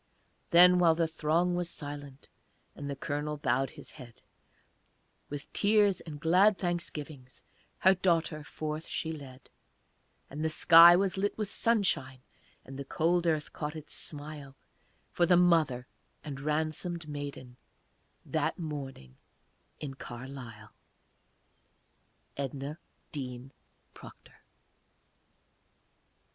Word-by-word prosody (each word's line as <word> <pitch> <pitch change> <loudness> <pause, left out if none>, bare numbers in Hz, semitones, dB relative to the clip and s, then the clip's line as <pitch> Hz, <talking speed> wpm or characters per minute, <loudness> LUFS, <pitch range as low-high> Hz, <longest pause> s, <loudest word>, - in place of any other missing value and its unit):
Then, 180 +1 +7
while 165 -2 +5
the 165 0 +1
throng 165 +3 +1
was 175 -1 -2
silent, 145 -3 -8 0.5
And 145 -1 -7
the 140 - -3
Colonel 150 +1 -3
bowed 135 -1 0
his - - -11
head, 125 -5 -14 1.1
With 145 -1 -7
tears 205 -2 +3
and 150 -3 -9
glad 185 +6 +4
thanksgivings 155 -7 -5 0.3
Her 190 - +5
daughter 165 -4 0
forth 155 +1 -5
she 160 - -3
led; 135 -5 -10 0.8
And 150 +3 -6
the 160 - +1
sky 170 +2 +8
was 190 0 +1
lit 205 +1 -1
with 215 -2 -3
sunshine, 155 - 0 0.4
And 135 +1 -9
the - - -3
cold 170 +5 +1
earth 155 -2 0
caught 150 +1 -4
its 155 -1 -9
smile 145 -2 -8 0.6
For 175 - +2
the 180 - +5
mother 160 -8 +3 0.4
and 140 -3 -6
ransomed 155 +3 -2
maiden, 140 -4 -7 0.7
That - - -1
morning 135 - -7 0.6
in 140 -3 -6
Carlisle. 120 -4 -9 1.7
EDNA 140 +3 -5 0.3
DEAN 130 -3 -6 0.4
PROCTOR. - - -15
150 Hz, 110 wpm, -30 LUFS, 135-170 Hz, 1.7 s, sky